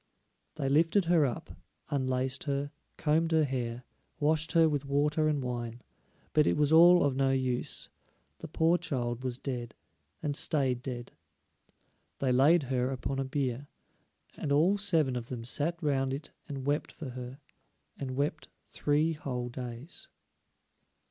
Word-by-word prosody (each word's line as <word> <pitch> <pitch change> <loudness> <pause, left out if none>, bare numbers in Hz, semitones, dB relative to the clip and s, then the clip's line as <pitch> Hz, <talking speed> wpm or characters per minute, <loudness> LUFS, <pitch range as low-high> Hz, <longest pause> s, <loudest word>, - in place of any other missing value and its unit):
They 135 - -2
lifted 165 +7 +3
her 165 -4 +4
up, 120 - -6 0.4
unlaced 130 -1 0
her, 140 0 -2 0.3
combed 160 +2 +1
her 160 -1 +4
hair, 125 -3 -3 0.4
washed 155 +2 +1
her 165 -1 +6
with 145 -3 -1
water 150 +2 +1
and 145 -3 0
wine, 120 -1 -4 0.5
but 150 -1 +4
it - - +2
was 150 +1 +3
all 175 +2 +8
of 140 -2 +1
no 135 0 +2
use; 130 -2 -1 0.5
the - - -7
poor 165 +2 +2
child 125 -7 -3
was 125 -2 -2
dead, 120 -4 -5 0.5
and 145 -1 -1
stayed 135 -6 +1
dead. 120 -2 -6 1.1
They 135 -2 0
laid 145 +6 +5
her 130 -1 0
upon 135 +1 -3
a - - +1
bier, 130 0 -2 0.7
and 140 - -4
all 165 +8 +4
seven 160 -10 +2
of 120 -1 -4
them 120 -3 -5
sat 150 +7 +1
round 135 -2 +1
it 145 +2 -8 0.2
and 135 -2 -5
wept 145 +1 0
for 155 -5 -8
her, 125 +1 -7 0.6
and 130 -2 -5
wept 150 +2 -2 0.2
three 150 +3 +1
whole 125 -5 -4
days. 125 +5 -8
140 Hz, 150 wpm, -30 LUFS, 125-155 Hz, 1.1 s, all